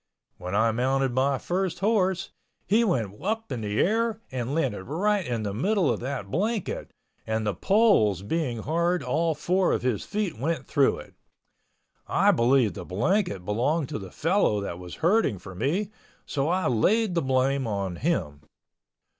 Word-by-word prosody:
When 90 +2 -4
I 110 +2 +3
mounted 130 +3 +1
my 135 +2 +2
first 180 +3 -2
horse, 190 -2 +1 0.3
he 220 +4 +3
went 115 - -1
up 220 0 -2
in 125 -3 -3
the 105 0 -2
air 225 +2 +1
and 130 +2 -3
landed 125 -12 -1
right 200 +7 0
in 120 -7 -3
the 100 -2 -3
middle 185 - +1
of - - -5
that 125 -6 -5
blanket, 210 +5 -2 0.4
and 110 0 -1
the 105 - 0
poles 110 - +3
being 120 -2 -2
hard 170 +3 0
all 165 0 0
four 180 +5 +1
of - - -1
his 125 -5 0
feet 200 - -3
went 160 +5 -1
through 140 -3 +2
it. - - -12 0.9
I - - +4
believe 120 -2 +3
the 95 - -7
blanket 100 - 0
belonged 130 - 0
to - - -4
the 95 -2 -8
fellow 160 - +1
that 90 -3 -5
was 90 -1 -8
herding 195 - +3
for 95 +1 -10
me, 165 - -1 0.3
so 140 -1 -1
I 185 +2 +1
laid 195 - +2
the 170 - +1
blame 130 -1 +1
on 100 -4 -3
him. 85 - -1
135 Hz, 170 wpm, -26 LUFS, -, 0.9 s, I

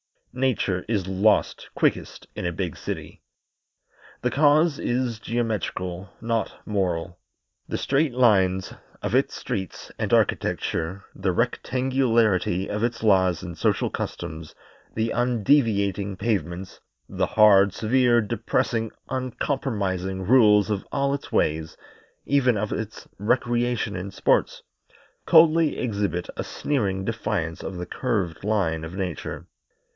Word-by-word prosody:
Nature 125 -8 0
is 105 -5 0
lost 100 +3 +1
quickest - - 0
in - - -4
a 85 - -1
big 90 -2 -3
city. - - -6 1.0
The 125 - 0
cause 150 +2 +4
is 120 -2 -1
geometrical, 105 -6 -3
not 115 -1 -1
moral. 90 -4 -2 0.5
The - - -2
straight 140 0 +1
lines 95 -6 +3 0.3
of - - -2
its - - +2
streets 95 -3 -5
and - - -2
architecture, 90 +5 0
the 95 -1 -1
rectangularity 115 -5 +1
of 105 +1 -3
its 115 -1 -1
laws 95 -5 +3
and 85 -2 -7
social - - +1
customs, 80 0 -6 0.4
the 110 +1 0
undeviating 110 -5 +1
pavements, 95 -4 -3 0.3
the - - -1
hard, 100 -2 +6
severe, 120 +1 +3
depressing, 115 +1 -1 0.2
uncompromising 105 -8 -2
rules 105 -2 +5
of 100 -2 -3
all 140 0 +1
its 140 - -5
ways 80 +1 0 0.5
even 130 -5 +3
of 105 +1 -2
its 110 0 -5
recreation 120 0 0
and 95 +2 -6
sports - - +1 0.6
coldly 160 -1 +5
exhibit 100 -7 -2
a - - -2
sneering 100 -9 -1
defiance 105 -7 -2
of 95 - -6
the 90 - -4
curved 100 -11 -2
line 90 -7 0
of 85 +3 -8
Nature. 95 -4 -4
105 Hz, 120 wpm, -24 LUFS, 95-120 Hz, 1.0 s, hard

